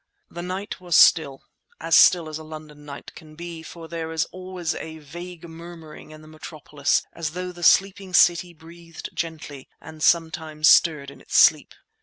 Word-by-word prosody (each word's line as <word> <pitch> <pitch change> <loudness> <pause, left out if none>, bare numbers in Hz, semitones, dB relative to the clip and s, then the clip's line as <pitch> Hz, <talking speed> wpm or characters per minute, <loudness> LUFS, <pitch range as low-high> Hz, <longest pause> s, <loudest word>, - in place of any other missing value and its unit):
The 175 - -7
night 185 +3 -6
was 175 -2 -1
still—as 160 +2 +1
still 175 -3 +5
as 155 0 -7
a - - -10
London 155 -1 -12
night 140 -1 -10
can 155 -2 -15
be; 170 0 -8
for 165 0 -11
there 160 0 -6
is 160 -1 -1
always 185 -2 -5
a 160 0 -8
vague 170 +3 -11
murmuring 165 -2 -12
in 155 0 -14
the - - -15
metropolis 155 -2 -3
as 160 -2 -5
though 180 +1 -5
the 175 -1 -13
sleeping 190 +1 +2
city 175 0 +4
breathed 165 0 -12
gently 155 -4 -7
and 160 -1 -13
sometimes 160 -2 +1
stirred 150 -4 +4
in - - -16
its - - -2
sleep. - - +4
160 Hz, 170 wpm, -23 LUFS, 155-175 Hz, -, still